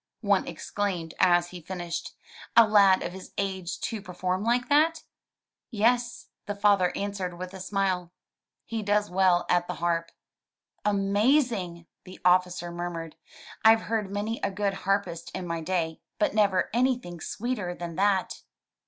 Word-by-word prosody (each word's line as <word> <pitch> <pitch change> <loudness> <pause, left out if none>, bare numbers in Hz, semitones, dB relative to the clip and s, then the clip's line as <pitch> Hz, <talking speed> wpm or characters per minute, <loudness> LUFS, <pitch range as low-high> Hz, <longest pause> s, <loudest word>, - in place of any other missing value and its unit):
one - - +2
exclaimed 185 -6 -3
as 175 -1 +4
he 180 -1 -9
finished, 175 0 -5 0.4
"a 230 -1 +9
lad 200 -3 +5
of - - -3
his 190 0 -11
age 190 -2 -3
to 220 -2 -3
perform 185 0 -2
like 240 +2 +1
that! 315 +3 +3 0.7
"Yes, 240 +2 0 0.2
the 205 - -3
father 200 -3 +3
answered 195 -3 -3
with 180 +1 -7
a 190 - -8
smile, 185 -2 -1 0.5
"he 225 -1 -3
does 205 0 +1
well 185 -1 +3
at 175 0 +2
the 180 - -4
harp.*' 165 0 -1 0.7
"Amazing, 205 - +1 0.2
the 185 - -12
officer 180 -1 +2
murmured, 170 -2 -5 0.5
"Fve 225 0 +7
heard 215 -3 -2
many 210 +3 -2
a - - 0
good 200 0 -1
harpist 195 -3 -2
in 185 - -4
my 170 -1 -3
day, 160 -1 -2 0.2
but 310 -3 +1
never 200 -3 +2
anything 240 -8 0
sweeter 210 -6 -3
than 175 -1 -6
that. 195 0 +1
190 Hz, 145 wpm, -27 LUFS, 175-210 Hz, 0.7 s, a